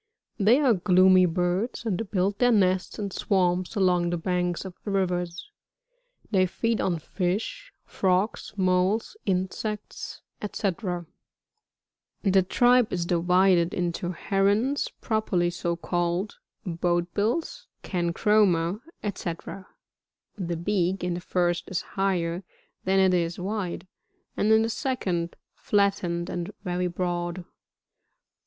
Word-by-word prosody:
They 220 Hz, +7 st, +5 dB
are 270 Hz, -5 st, +4 dB
gloomy 185 Hz, -1 st, +5 dB
birds, 180 Hz, +8 st, -1 dB
and 215 Hz, -1 st, -2 dB
build 195 Hz, +1 st, 0 dB
their 245 Hz, 0 st, +4 dB
nests 190 Hz, -3 st, +2 dB
in 200 Hz, -2 st, -3 dB
swamps, 185 Hz, 0 st, 0 dB
along 180 Hz, -3 st, +2 dB
the 175 Hz, -, -1 dB
banks 180 Hz, +1 st, -1 dB
of 190 Hz, -, -7 dB
rivers. 180 Hz, -, -2 dB, 0.8 s
They 185 Hz, -3 st, +3 dB
feed 230 Hz, +5 st, -1 dB
on 175 Hz, -3 st, 0 dB
fish, 205 Hz, -, -3 dB
frogs, 190 Hz, +3 st, 0 dB
moles, 185 Hz, -, +1 dB
insects, 195 Hz, +3 st, -3 dB, 0.2 s
&c. 210 Hz, -, -2 dB
34. 180 Hz, -3 st, -2 dB, 1.2 s
The 195 Hz, -2 st, +4 dB
tribe 245 Hz, +5 st, +3 dB
is 175 Hz, -2 st, -1 dB
divided 180 Hz, 0 st, +3 dB
into 175 Hz, 0 st, -2 dB
Herons 205 Hz, +10 st, +1 dB
properly 195 Hz, -6 st, 0 dB
so 170 Hz, 0 st, -2 dB
called, 175 Hz, +3 st, -2 dB, 0.3 s
Boat 175 Hz, 0 st, 0 dB
f -, -, -47 dB
bills 320 Hz, -, -1 dB, 0.2 s
{Cancroma) 180 Hz, 0 st, +2 dB, 0.2 s
&.c. 200 Hz, -4 st, -2 dB, 1.0 s
The 175 Hz, -4 st, -3 dB
beak 185 Hz, 0 st, 0 dB
in 180 Hz, -1 st, 0 dB
the 175 Hz, -, -4 dB
first 175 Hz, -1 st, 0 dB
is 185 Hz, -, -1 dB
higher 180 Hz, -2 st, -1 dB, 0.4 s
than 190 Hz, +1 st, +2 dB
it 190 Hz, -1 st, +4 dB
is 170 Hz, -1 st, 0 dB
wide, 190 Hz, -2 st, -3 dB, 0.5 s
and 215 Hz, -, +2 dB
in 220 Hz, 0 st, +6 dB
the 225 Hz, -, 0 dB
second 185 Hz, -, -2 dB, 0.2 s
flattened 195 Hz, -4 st, 0 dB
and 175 Hz, -1 st, -4 dB
very 180 Hz, -1 st, -1 dB
broad. 175 Hz, 0 st, -3 dB
185 Hz, 120 wpm, -26 LUFS, 175-205 Hz, 1.2 s, in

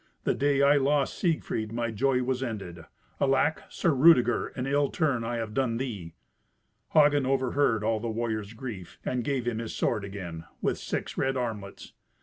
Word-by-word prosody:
The -, -, +2 dB
day 140 Hz, 0 st, +2 dB
I 145 Hz, +1 st, +6 dB
lost 140 Hz, 0 st, +2 dB
Siegfried 155 Hz, -, -1 dB
my 115 Hz, 0 st, -2 dB
joy 125 Hz, +3 st, +1 dB
was 130 Hz, 0 st, -1 dB
ended. 95 Hz, -9 st, -5 dB, 0.3 s
Alack! 140 Hz, +3 st, +2 dB
Sir 170 Hz, -, +1 dB
Rudeger, 130 Hz, -3 st, +5 dB
an 125 Hz, -, -3 dB
ill 140 Hz, +1 st, +2 dB
turn 140 Hz, -8 st, 0 dB
I 120 Hz, +1 st, -2 dB
have 115 Hz, -2 st, -4 dB
done 125 Hz, -3 st, 0 dB
thee." 105 Hz, -11 st, -5 dB, 0.8 s
Hagen 145 Hz, -3 st, +5 dB
overheard 130 Hz, -4 st, +1 dB
all 110 Hz, 0 st, +1 dB
the 115 Hz, +1 st, -3 dB
warrior's 110 Hz, -2 st, -3 dB
grief, 110 Hz, -7 st, -8 dB
and 125 Hz, -1 st, -1 dB
gave 130 Hz, -2 st, -1 dB
him 115 Hz, -2 st, -1 dB
his 115 Hz, -1 st, -5 dB
sword 105 Hz, -4 st, 0 dB
again, 90 Hz, -5 st, -7 dB
with -, -, -1 dB
six -, -, -4 dB
red 135 Hz, 0 st, +1 dB
armlets. 110 Hz, -5 st, -5 dB
120 Hz, 170 wpm, -28 LUFS, 110-135 Hz, 0.8 s, I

